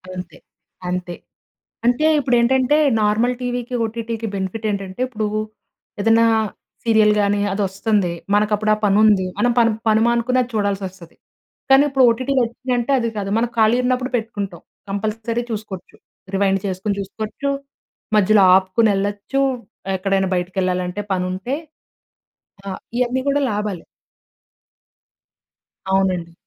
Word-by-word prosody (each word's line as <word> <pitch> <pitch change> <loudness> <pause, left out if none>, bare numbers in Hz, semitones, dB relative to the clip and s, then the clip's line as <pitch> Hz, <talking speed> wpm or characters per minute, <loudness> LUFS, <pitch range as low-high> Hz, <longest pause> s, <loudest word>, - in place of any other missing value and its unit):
అంతే. 180 -3 -8 0.5
అంతే. 180 -1 -3 0.7
అంటే 245 +6 +3
ఇప్పుడేంటంటే, 260 +2 +3 0.2
నార్మల్ 215 +4 +2
టీవీకి, 245 0 -3
ఓటీటీకి 230 0 -4
బెనిఫిట్ 195 +3 -4
ఏంటంటే, 195 +1 -5
ఇప్పుడు 220 -4 -3 0.8
ఏదన్నా 225 +2 +4 0.6
సీరియల్‌ 220 -2 +4
గాని 205 0 +1
అది 205 - -2
వస్తుంది. 195 -2 0 0.2
మనకు 210 +1 +2
అప్పుడు 215 +1 0
ఆ - - -9
పని 200 0 +3
ఉంది. 205 -3 +4
మనం 245 - +3
పని, 230 -1 +4 0.2
పని 215 0 +4
మానుకుని 235 +2 +1
అది 245 - -4
చూడాల్సొస్తది. 195 -4 -3 0.6
కానీ 270 +1 +7
ఇప్పుడు 270 -1 +3
ఓటీటీ 255 +4 0
వచ్చిందంటే 245 +2 -2
అది 230 -1 -1
కాదు. 195 -1 -3
మనం 235 +1 +1
ఖాళీగా 230 +3 +3
ఉన్నప్పుడు 255 +1 0
పెట్టుకుంటాం. 200 -6 -5 0.3
కంపల్సరీ 220 +4 -2
చూసుకోవచ్చు. 210 -4 -7 0.4
రివైండ్ 195 0 +2
చేసుకొని 195 +2 -2
చూసుకోవచ్చు, 215 +7 -4 0.7
మధ్యలో 205 0 +5
ఆపుకొనెళ్ళొచ్చు, 205 +5 +1 0.6
ఎక్కడైనా 190 0 0
బయటికెళ్ళాలంటే, 180 +1 -1
పనుంటే 185 +7 -2 1.1
ఆహ్, 190 - -4 0.2
ఇయన్ని 250 +1 +1
కూడా 285 +1 +2
లాభాలే. 205 -4 -3 2.1
అవునండి. 185 -3 0
215 Hz, 115 wpm, -20 LUFS, 195-235 Hz, 2.1 s, కానీ